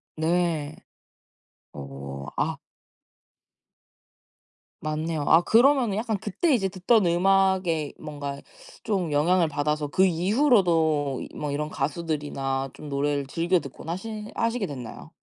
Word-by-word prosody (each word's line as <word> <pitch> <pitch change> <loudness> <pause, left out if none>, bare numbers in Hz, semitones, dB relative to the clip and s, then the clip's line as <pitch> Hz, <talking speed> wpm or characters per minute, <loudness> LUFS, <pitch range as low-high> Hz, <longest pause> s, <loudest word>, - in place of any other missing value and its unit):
네. 160 -2 0 1.0
어. 70 0 -8
아 - - 0 2.2
맞네요. 155 0 -2
아 165 +2 +7
그러면은 240 -1 +4
약간 220 -2 -1
그때 270 - 0
이제 195 -6 +1
듣던 195 +2 +2
음악에 185 -3 +2
뭔가 145 -2 -6 0.4
좀 185 -7 -1
영향을 165 +4 +3
받아서 150 0 -1
그 185 +6 +3
이후로도 170 - +2
뭐 150 -1 -3
이런 150 +2 -2
가수들이나 140 -3 -2
좀 150 - -10
노래를 140 0 -1
즐겨 170 +5 +1
듣곤 140 +2 -10
하시 210 +4 -5
하시게 230 -2 0
됐나요? 125 -5 -8
165 Hz, 235 characters per minute, -26 LUFS, 145-190 Hz, 2.2 s, 아